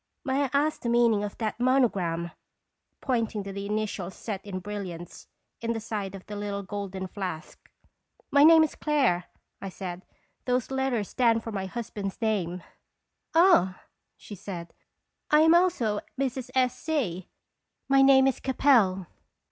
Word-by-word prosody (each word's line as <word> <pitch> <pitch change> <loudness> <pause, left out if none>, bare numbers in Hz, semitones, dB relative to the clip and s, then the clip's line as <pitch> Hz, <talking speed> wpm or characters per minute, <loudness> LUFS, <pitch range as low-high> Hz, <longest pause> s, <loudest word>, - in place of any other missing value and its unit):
May 275 +1 +1
I - - -4
ask 295 +2 +1
the 235 - -2
meaning 235 -3 +3
of 205 - -5
that 220 0 -3
mon 255 +1 +4
ogram?" 170 -4 -3 0.7
pointing 230 -5 -1
to 195 0 -7
the 200 0 -5
initials 210 -3 -3
set 205 -4 -5
in 195 -2 -5
bril 205 +1 -5
liants 175 -1 -10 0.3
in 230 0 -1
the 225 - -3
side 210 -3 -4
of 190 - -11
the 210 - -7
little 205 -1 -4
gold 200 -1 -6 0.2
flask. 180 -5 -7 0.3
" - - -38
My 285 0 +6
name 320 +1 +8
is 315 - -1
Clare/' 265 - +1 0.4
I 195 - -5
said. 185 -1 -7 0.2
" 195 -1 -44
Those 250 0 0
let 265 0 0
ters 225 -6 -2
stand 230 -3 +2
for 225 - -5
my 195 -2 -3
husband's 205 -2 -5
name." 185 -6 -1 0.7
"Ah!" 325 - +5 0.4
she - - -11
said, 175 -3 -8 0.6
"I 300 0 +5
am 320 +1 +6
also 335 - +2 0.2
Mrs. 260 -2 -2
S. 255 -1 +2
C. 230 - -3 0.6
My 275 0 +5
name 270 -1 +6
is 270 - +1
Capel." 230 -9 +3
215 Hz, 165 wpm, -27 LUFS, 195-265 Hz, 0.7 s, name